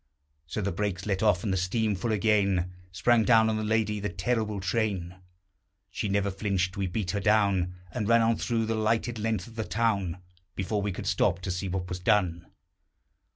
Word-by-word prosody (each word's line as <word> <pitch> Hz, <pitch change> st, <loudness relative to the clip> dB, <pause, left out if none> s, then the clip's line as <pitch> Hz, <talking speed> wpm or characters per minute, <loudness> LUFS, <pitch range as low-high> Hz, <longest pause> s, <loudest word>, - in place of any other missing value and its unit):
So 110 Hz, -, -3 dB
the 100 Hz, 0 st, -1 dB
brakes 95 Hz, 0 st, -2 dB
let 95 Hz, -3 st, -1 dB
off, 105 Hz, -5 st, +3 dB
and 100 Hz, -4 st, 0 dB
the -, -, +1 dB
steam 105 Hz, +4 st, 0 dB
full 100 Hz, +4 st, -2 dB
again, 100 Hz, -4 st, +2 dB, 0.2 s
Sprang 110 Hz, +6 st, +3 dB
down 110 Hz, -1 st, +5 dB
on 110 Hz, -, -1 dB
the 110 Hz, -, -2 dB
lady 105 Hz, -1 st, +1 dB
the 105 Hz, +1 st, -2 dB
terrible 105 Hz, +3 st, -1 dB
train. 95 Hz, -2 st, -1 dB, 0.7 s
She 105 Hz, -, -3 dB
never 100 Hz, 0 st, +1 dB
flinched. 95 Hz, -1 st, -1 dB
We 100 Hz, -2 st, -1 dB
beat 90 Hz, 0 st, -2 dB
her 100 Hz, -, -1 dB
down, 100 Hz, -3 st, +2 dB, 0.2 s
And 105 Hz, +5 st, -2 dB
ran 115 Hz, 0 st, +5 dB
on 115 Hz, 0 st, +2 dB
through 115 Hz, -2 st, 0 dB
the 115 Hz, -, -1 dB
lighted 115 Hz, +1 st, 0 dB
length 110 Hz, -4 st, -1 dB
of 115 Hz, 0 st, -14 dB
the 110 Hz, -, -1 dB
town 105 Hz, -6 st, 0 dB, 0.4 s
Before 100 Hz, +2 st, -1 dB
we 100 Hz, 0 st, -1 dB
could 90 Hz, -, -6 dB
stop 85 Hz, -, +2 dB
to 90 Hz, -, -3 dB
see 90 Hz, +2 st, -3 dB
what 90 Hz, 0 st, -3 dB
was 90 Hz, 0 st, -4 dB
done. 90 Hz, -4 st, +1 dB
100 Hz, 200 wpm, -28 LUFS, 90-110 Hz, 0.7 s, down